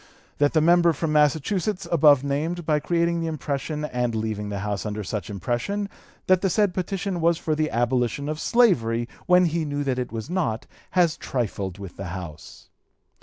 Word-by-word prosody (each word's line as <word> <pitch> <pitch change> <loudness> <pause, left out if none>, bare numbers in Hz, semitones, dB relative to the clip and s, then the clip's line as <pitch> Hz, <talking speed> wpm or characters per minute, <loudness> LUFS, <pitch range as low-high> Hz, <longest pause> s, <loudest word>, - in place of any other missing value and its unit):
That 145 0 +3
the 160 - +4
member 170 +1 +5
from 160 +1 -2
Massachusetts 170 +6 +1
above 145 -5 +6
named, 155 +5 -2
by 155 -2 +2
creating 170 +2 0
the 165 - -2
impression 150 0 -3
and 125 -4 -1
leaving 110 -2 -3
the 100 -1 -4
House 100 -3 -2
under 105 0 -4
such 105 +2 -4
impression, 120 - -2 0.4
that 185 -1 +4
the 195 - +2
said 205 0 +2
petition 185 -1 -2
was 170 0 +3
for 160 - -1
the 155 0 0
abolition 120 +3 0
of 155 0 -3
slavery, 120 - +2 0.2
when 180 0 +6
he 165 0 0
knew 145 -1 -2
that 130 -2 -1
it 125 - -3
was 110 -1 -5
not, 160 -12 -1 0.3
has 170 -3 +4
trifled 100 -7 -3
with 100 -3 -9
the 95 - -5
House. 80 -4 -10
150 Hz, 180 wpm, -24 LUFS, 115-170 Hz, 0.4 s, above